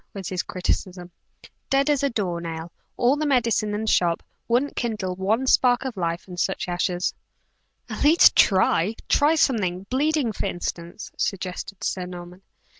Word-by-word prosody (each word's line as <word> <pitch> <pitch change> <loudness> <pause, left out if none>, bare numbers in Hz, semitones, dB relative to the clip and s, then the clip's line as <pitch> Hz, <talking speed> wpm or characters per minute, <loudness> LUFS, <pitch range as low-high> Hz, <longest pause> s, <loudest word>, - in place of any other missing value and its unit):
was 195 -3 -5
his 185 -1 -1
criticism, 180 0 -3 0.6
"dead 275 +1 +2
as 290 -3 +2
a 280 - +1
door 185 -8 -2
nail! 165 0 -6 0.3
All 255 +4 +3
the 305 0 -1
medicine 230 -5 +1
in 210 - -2
the 220 - -4
shop 170 -5 +2 0.2
wouldn't 250 +5 +1
kindle 210 -6 -2
one 210 +7 0
spark 250 -1 +3
of 260 -3 -4
life 170 -1 -3
in 180 -1 -9
such 190 +1 -1
ashes!" 175 0 -1 0.7
"At - - -4
least, 310 +4 +6
try! 190 +1 +3
Try 300 +3 +3
something 195 - +1
bleeding 290 -2 +1
for - - -3
instance," 175 +2 -5
suggested 185 +1 -4
Sir 180 -1 -2
Norman. 180 +1 -10
195 Hz, 160 wpm, -24 LUFS, 180-250 Hz, 0.7 s, least